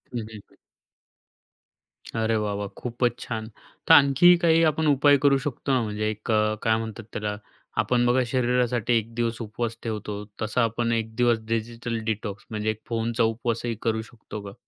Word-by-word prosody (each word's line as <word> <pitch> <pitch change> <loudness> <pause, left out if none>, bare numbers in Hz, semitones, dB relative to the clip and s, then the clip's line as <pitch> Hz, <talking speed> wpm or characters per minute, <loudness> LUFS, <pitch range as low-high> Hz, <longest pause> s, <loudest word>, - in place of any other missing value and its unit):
हं, - - 0
हं, 110 - -6 0.2
हं. - - -23 1.6
अरे 110 0 +1
वाह 105 -1 -1
वाह! 100 0 -3
खूपच 120 0 -1
छान. 110 -2 -5 0.4
तर - - +8
आणखी 145 +4 +7
काही 165 -1 +4
आपण 155 +1 -1
उपाय 145 0 +5
करू 140 -1 +5
शकतो 140 0 -3
ना, 130 - +3
म्हणजे 105 -1 -2
एक 110 +2 -4
अ, 110 0 +2
काय 110 0 +3
म्हणतात 110 0 -6
त्याला 105 -1 -2 0.5
आपण 120 -1 +2
बघा 125 +2 +3
शरीरासाठी 125 -2 +1
एक 115 +1 -4
दिवस 115 0 -1
उपवास 115 +1 -4
ठेवतो. 105 -2 -4 0.2
तसा 110 +3 +1
आपण 115 +1 0
एक 110 -1 -2
दिवस 120 -1 +3
डिजिटल 115 +1 -2
डिटॉक्स 105 -2 -5
म्हणजे 110 0 -1
एक 110 0 -9
फोनचा 115 0 0
उपवासही 115 +1 -1
करू 110 -1 0
शकतो 110 -2 -10
का? 100 -1 -9
115 Hz, 170 wpm, -25 LUFS, 110-125 Hz, 1.6 s, तर